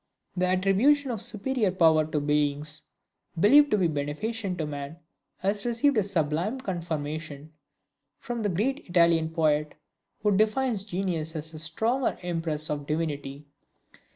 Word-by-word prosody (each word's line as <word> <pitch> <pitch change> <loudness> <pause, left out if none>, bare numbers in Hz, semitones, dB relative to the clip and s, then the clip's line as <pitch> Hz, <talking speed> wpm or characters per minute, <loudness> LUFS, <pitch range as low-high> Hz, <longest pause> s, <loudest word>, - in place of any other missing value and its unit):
The 185 0 +1
attribution 200 +10 +3
of 220 -4 -4
superior 220 0 -1
power 160 -4 +4
to 155 -1 -1
beings 150 +1 -1 0.6
believed 285 - +6
to 210 - +2
be 185 -3 +3
beneficent 180 +7 -3
to 160 - -2
man, 145 +1 -6 0.4
has 200 +2 -1
received 240 +4 +2
a 215 - +4
sublime 185 - -1
conformation 155 - -5 0.6
from 240 -2 -5
a 205 - +1
great 240 - -1
Italian 170 -2 +3
poet, 155 -2 +1 0.5
who 210 -2 +3
defines 215 0 +1
genius 175 -5 -3
as 160 +1 -6
a 155 - -8
"stronger 225 +11 0
impress 165 -3 -2
of 145 -1 -4
Divinity!" 150 -2 -3
175 Hz, 135 wpm, -27 LUFS, 155-215 Hz, 0.6 s, believed